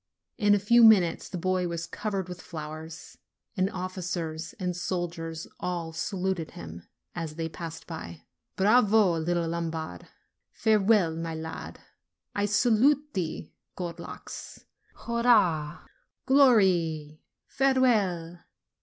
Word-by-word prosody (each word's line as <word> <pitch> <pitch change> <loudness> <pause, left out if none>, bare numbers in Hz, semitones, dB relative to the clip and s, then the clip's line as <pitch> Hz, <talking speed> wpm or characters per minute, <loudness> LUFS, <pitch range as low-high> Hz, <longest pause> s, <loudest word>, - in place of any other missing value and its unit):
In 205 -2 +5
a - - +3
few 235 +4 +5
minutes 195 -7 +5
the 185 - -5
boy 185 +1 0
was 170 -1 -4
covered 200 -2 -3
with 180 -1 -8
flowers, 160 0 -8 0.4
and 190 -1 +1
officers 180 -3 -4
and 180 -2 -2
soldiers 170 -2 -4
all 170 -2 -3
saluted 185 -1 -2
him 85 0 -9 0.3
as 165 -3 -5
they 165 0 -3
passed 165 0 -8
by: 85 - -8 0.3
"Bravo, 205 -4 +4
little 170 +1 0
Lombard!" 165 - -4 0.5
"Farewell, 210 -5 +3
my 165 0 -4
lad!" 160 0 -7 0.5
"I 205 - 0
salute 250 +8 +3
thee, 165 -5 -4 0.2
gold 175 -2 -5
locks!" - - -9 0.3
"Hurrah!" 205 -10 +2 0.4
"Glory!" 180 - +3 0.2
"Farewell!" 210 -11 +1
175 Hz, 110 wpm, -28 LUFS, 165-205 Hz, 0.5 s, In